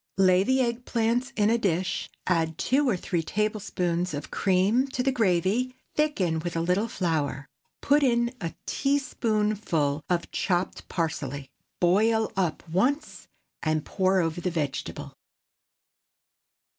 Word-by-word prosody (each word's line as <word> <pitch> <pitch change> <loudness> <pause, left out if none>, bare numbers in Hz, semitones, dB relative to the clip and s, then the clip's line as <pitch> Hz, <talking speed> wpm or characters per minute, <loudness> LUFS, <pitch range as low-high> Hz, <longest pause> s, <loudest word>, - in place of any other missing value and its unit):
Lay 185 -1 +5
the 260 +6 +2
egg 240 0 -1
plants 240 +3 0
in 210 +1 +3
a 235 - +2
dish, 190 -1 -1 0.2
add 165 -3 +1
two 275 +1 +2
or 200 - +1
three 175 -1 -1
tablespoonfuls 180 -3 -1
of 145 - -6
cream 200 +8 +2
to 260 -2 -2
the 270 - +2
gravy, 220 +3 +1 0.2
thicken 195 - +1
with 170 +1 -4
a 165 - +1
little 180 +6 +1
flour, 155 -9 -1 0.4
put 290 +1 +4
in 240 -2 +2
a 165 -2 -4
teaspoonful 215 - 0
of 175 -1 -1
chopped 180 -1 -1
parsley, 145 -5 -3 0.3
boil 220 +5 +3
up 175 -3 -1
once, 250 - -1 0.3
and 155 -1 0
pour 190 -1 +2
over 165 +1 -2
the 180 - 0
vegetable. 150 -5 -4
190 Hz, 130 wpm, -27 LUFS, 170-235 Hz, 0.4 s, Lay